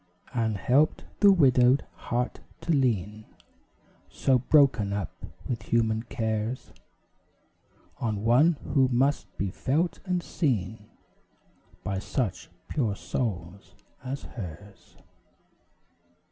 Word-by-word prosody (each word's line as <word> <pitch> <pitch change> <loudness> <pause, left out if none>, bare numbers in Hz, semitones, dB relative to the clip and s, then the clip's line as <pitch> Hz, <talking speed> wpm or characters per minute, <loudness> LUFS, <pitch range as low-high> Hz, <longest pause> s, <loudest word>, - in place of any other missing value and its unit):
And 110 -4 0
helped 140 +9 +2
the 200 -1 +7
widowed 130 -6 +4
heart 125 +1 -3 0.2
to 170 - -1
lean, 110 - 0 0.8
So 130 -2 +2
broken 130 -7 +3
up 100 -5 -3 0.4
with 120 -4 -2
human 110 +1 +1
cares, 110 +1 -3 1.3
On 110 -3 -2
one 130 +9 +5 0.2
who 135 -2 +5
must 130 -2 +1
be 100 -1 -1
felt 155 - 0
and 180 -2 -1
seen 110 - -2 0.9
By 100 -2 -2
such 105 -1 -3 0.2
pure 115 -9 -1
souls 100 -5 -4 0.3
as 135 +2 -5
hers. 100 -1 -10
120 Hz, 100 wpm, -27 LUFS, 105-135 Hz, 1.3 s, the